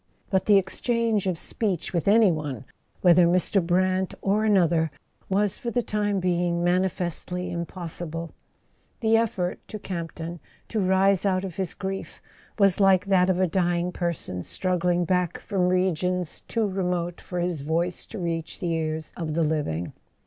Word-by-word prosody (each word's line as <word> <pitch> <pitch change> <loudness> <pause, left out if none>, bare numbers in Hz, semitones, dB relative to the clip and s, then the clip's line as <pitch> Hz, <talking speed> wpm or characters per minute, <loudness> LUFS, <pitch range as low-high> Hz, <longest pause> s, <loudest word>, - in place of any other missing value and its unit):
But 190 -1 +2
the 205 -2 +7
exchange 220 +2 0
of 180 -3 0
speech 190 -1 -2
with 170 -1 -1
any 210 -1 +6
one, 145 -5 -4 0.4
whether 175 -1 +6
Mr. 180 +2 +2
Brant 185 +2 +1
or 205 +2 +2
another, 170 -6 +3 0.4
was 200 0 +1
for 240 - -3
the 245 +1 0
time 205 -2 0
being 175 -1 0
mani¬ 180 +2 +3
festly 180 0 -3
impossible. 170 -1 -5 0.7
The 225 -1 +4
effort, 200 -6 0
to 215 - -6
Campton, 170 -3 -5 0.3
to 220 - -1
rise 190 0 +3
out 190 -1 +1
of 185 -1 -7
his 190 -4 -2
grief, 195 0 -5 0.4
was 195 -3 +4
like 195 -1 +5
that 190 -2 +3
of 185 -1 +2
a 185 - +4
dying 175 0 0
person 170 - -3
struggling 180 - 0
back 180 -1 0
from 185 -3 0
regions 180 -1 0
too 225 -2 0
remote 180 -2 -2
for 180 - -5
his 175 -4 -1
voice 165 +4 -1
to 225 - -8
reach 170 -3 -3
the 175 - -1
ears 160 -1 -3
of 155 -3 -3
the 165 - +2
living. 145 - -1
180 Hz, 160 wpm, -25 LUFS, 170-195 Hz, 0.7 s, the